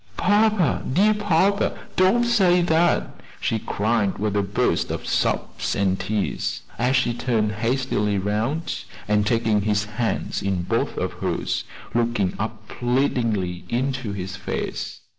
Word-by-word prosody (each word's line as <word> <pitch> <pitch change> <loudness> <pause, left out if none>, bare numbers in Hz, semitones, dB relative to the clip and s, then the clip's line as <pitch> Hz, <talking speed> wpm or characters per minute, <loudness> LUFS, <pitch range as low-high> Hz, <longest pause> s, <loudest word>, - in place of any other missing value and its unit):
"Papa, 205 -3 +3
dear 205 +9 +4
papa, 200 -1 +2 0.2
don't 190 +6 +4
say 190 -7 +4
that," 170 0 +1 0.2
she 110 - 0
cried 105 -1 0
with 105 0 -1
a 100 - +3
burst 100 +1 0
of - - -4
sobs - - -1
and 95 -1 +1
tears, 100 +2 -2 0.2
as 125 +2 +2
she 130 -2 +2
turned 115 -3 0
hastily 110 -2 0
round, 110 - -2 0.2
and 105 0 +2
taking 115 -3 +2
his 105 0 +1
hand 110 +2 -2
in 95 -3 0
both - - -1
of - - -2
hers, - - -1 0.3
looked 120 -1 +1 0.2
up 110 0 -4
pleadingly 115 -8 0
into 130 -2 -1
his 95 -1 -5
face. 95 - -4
115 Hz, 135 wpm, -23 LUFS, 105-155 Hz, 0.3 s, dear